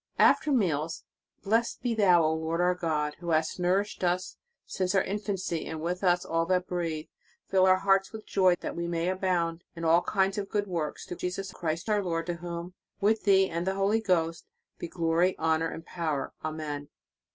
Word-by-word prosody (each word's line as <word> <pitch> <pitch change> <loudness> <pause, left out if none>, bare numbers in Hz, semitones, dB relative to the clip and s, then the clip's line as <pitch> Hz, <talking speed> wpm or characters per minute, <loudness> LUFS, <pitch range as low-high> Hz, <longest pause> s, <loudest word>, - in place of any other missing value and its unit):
"* - - -38
After 305 - -2
meals: 165 - 0 0.4
"Blessed 225 +4 0
be 245 -2 +1
thou, 185 -6 +5
O 155 0 +2
Lord 160 +1 -2
our 180 +1 +3
God, 155 -4 -1
who 170 -1 -6
hast 160 +2 +1
nourished 190 +3 0
us 180 +1 0 0.3
since 185 0 -1
our 190 - +4
infancy, 195 -4 -3
and 160 0 -5
with 180 +4 -3
us 180 -1 +3
all 165 0 0
that 180 0 +1
breathe. 165 -4 -3 0.5
Fill 190 -1 +5
our 185 0 +6
hearts 195 0 +2
with 220 -1 -9
joy, 185 -2 +3
that - - -4
we 170 0 -3
may 170 +1 -1
abound 175 -3 -1
in 165 0 -5
all 165 +2 +5
kinds 195 +1 +1
of 200 - -5
good 205 -1 0
works, 165 -6 -3
through 175 - -7
Jesus 180 +2 -4
Christ 165 +2 -3
our 210 -2 +2
Lord, 165 -2 -2
to 175 - -2
whom, 170 +1 -6 0.3
with 215 +2 +2
Thee 195 -1 +5
and 170 +1 -3
the 190 - 0
Holy 200 +3 +2
Ghost, 165 -5 0 0.3
be - - -4
glory, 170 +2 +1
honor 160 0 +1
and 165 - -8
power, 160 -5 -3
Amen." 150 -2 -4
175 Hz, 195 wpm, -28 LUFS, 165-195 Hz, 0.5 s, our